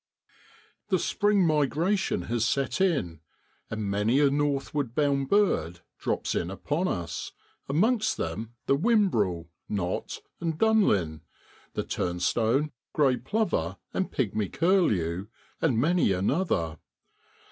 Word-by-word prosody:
The - - +3
spring 205 -3 +2
migration 155 - +1
has 115 +2 -1
set 135 +8 0
in, 140 - +1 0.5
and 110 0 -3
many 105 +6 +2
a 145 -2 +4
northward 140 -3 -1
bound 140 -2 +1
bird 90 - +2 0.2
drops - - -1
in 85 - -1
upon 145 - -2
us, 85 - -4 0.4
amongst 215 - +2
them 115 +2 -4
the 135 - +3
whimbrel, 120 - +1 0.2
knot, 95 -3 -3 0.2
and 165 -2 -2
dunlin, 105 - +2 0.5
the - - -2
turnstone, 115 +11 0 0.2
grey 135 -4 +3
plover, 125 - -1 0.2
and 190 - -1
pigmy 110 -5 -1
curlew, 100 - +1 0.3
and 140 -8 +2
many 155 - +3
another. 95 - 0
135 Hz, 115 wpm, -27 LUFS, -, 0.5 s, a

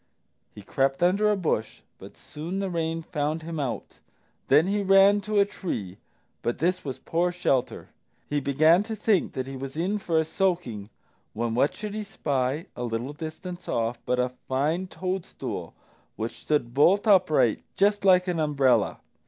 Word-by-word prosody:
He 105 - -10
crept 135 - 0
under 200 +4 +3
a 210 - +2
bush, 135 - -2 0.2
but - - -12
soon 165 +6 -6
the 195 -1 -2
rain 165 -1 -2
found 155 0 -2
him 165 -1 -5
out. 130 -5 -4 0.5
Then 150 +4 +5
he 205 +2 0
ran 195 +1 +5
to 210 0 0
a 200 - +5
tree, 110 - -5 0.4
but 120 - -1
this 180 +3 0
was 135 -3 -5
poor 175 +2 0
shelter. 135 -8 -1 0.4
He 145 - 0
began 155 +6 +4
to 220 +1 -5
think 210 -3 +1
that 130 -1 -3
he 135 0 -7
was 135 +2 -7
in 190 +5 0
for 170 -4 -1
a 160 - +4
soaking 160 - -1 0.4
when 115 +1 -2
what 130 +5 +2
should 210 -1 -6
he 215 0 -3
spy, 145 -5 -2
a 125 - -5
little 120 +4 -3
distance 170 +3 -7
off, 115 +1 -1
but 125 - +1
a 125 0 +1 0.2
fine 155 +8 0
toadstool 185 0 -5 0.4
which 110 +1 -5
stood 130 -6 0
bolt 180 - +4
upright 185 - +4
just 205 +1 +2
like 185 -1 +5
an 175 -2 -1
umbrella. 135 - +2
160 Hz, 170 wpm, -26 LUFS, 130-190 Hz, 0.5 s, Then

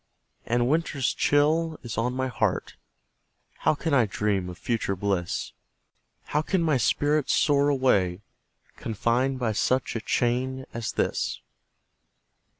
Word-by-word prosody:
And 120 +1 +2
winter's 145 -3 0
chill 155 +2 +2
is 120 -3 -5
on 125 +3 -1
my 130 0 -1
heart 125 - -1 0.8
How - - +2
can 160 +1 -2
I 125 -5 +4
dream 100 -2 -1
of 90 - -8
future 110 -3 -1
bliss? 95 -2 -2 0.7
How 150 - 0
can 175 +2 0
my 155 -4 +2
spirit 145 +5 +1
soar 145 -1 +3
away, 105 -10 +2 0.6
Confined 120 +4 0
by 120 -3 0
such 125 +5 0
a 115 - -2
chain 130 +3 0
as 115 -1 -3
this? - - -1
125 Hz, 130 wpm, -26 LUFS, 110-145 Hz, 0.8 s, I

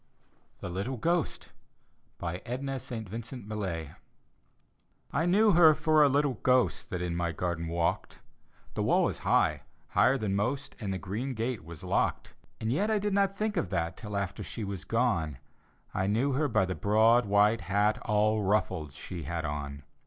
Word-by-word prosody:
THE - - -5
LITTLE 100 +9 -3
GHOST: 170 +7 -1 0.7
edna 125 +10 -4
st. 120 -4 -6
vincknt 115 +3 -7
millay 95 -8 -4 1.2
I 165 - +1
knew 210 +4 +5
her 165 -3 +7
for 155 0 +3
a 145 - +6
little 140 -3 +1
ghost 125 -1 +2
That 90 -3 -3
in 85 -1 -2
my 85 -1 -1
garden 85 0 -3
walked; 85 0 -1 0.5
The - - -2
wall - - +3
is - - -5
high - - +2 0.2
— - - -37
higher 135 +2 +4
than 105 -5 -1
most 130 +8 -2
— - - -25
And 100 -4 -3
the 95 - -1
green 110 +8 -4
gate 115 -3 -2
was 85 -1 -9
locked. - - -1 0.3
And 110 +1 -1
yet 205 +9 +1
I 220 - +2
did 205 0 -1
not 195 0 +2
think 215 0 -1
of 90 - 0
that 85 -1 -1
Till 105 -2 -5
after 100 -1 -3
she 115 - -5
was 100 -5 -5
gone 95 - 0 0.3
— - - -36
I 95 - 0
knew 115 +8 +1
her 145 +3 +1
by 110 -7 +2
the 90 - -2
broad 110 +4 +4
white 105 +2 +4
hat. 100 +4 +1
All 105 +1 +1
ruffled, 95 -7 0
she 85 +4 -7
had 80 +1 -3
on. 70 -1 -5
105 Hz, 180 wpm, -29 LUFS, 90-130 Hz, 1.2 s, her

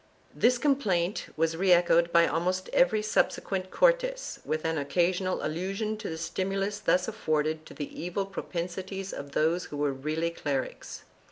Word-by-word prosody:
This 250 +1 +3
complaint 210 - +1
was 165 +1 +1
re 185 +2 +2
echoed 170 -1 +5
by 170 0 +6
almost 185 +3 -1
every 220 -5 +4
subse 215 - +2
quent 185 -1 -3
Cortes, - - +1
with 155 +1 -2
an 160 -1 0
occasional 180 +5 0
allusion 195 +7 -2
to 215 - -5
the 160 - -4
stimulus 195 +4 -2
thus 185 -3 +2
afforded 155 0 -1
to - - -12
the 145 - -6
evil 180 +3 -2
propensities 190 +1 -5
of 140 0 -7
those 165 +3 +1
who 145 - -7
were 145 -1 +1
really 155 +5 -2
clerics. 140 -5 -4
180 Hz, 160 wpm, -28 LUFS, 160-195 Hz, -, by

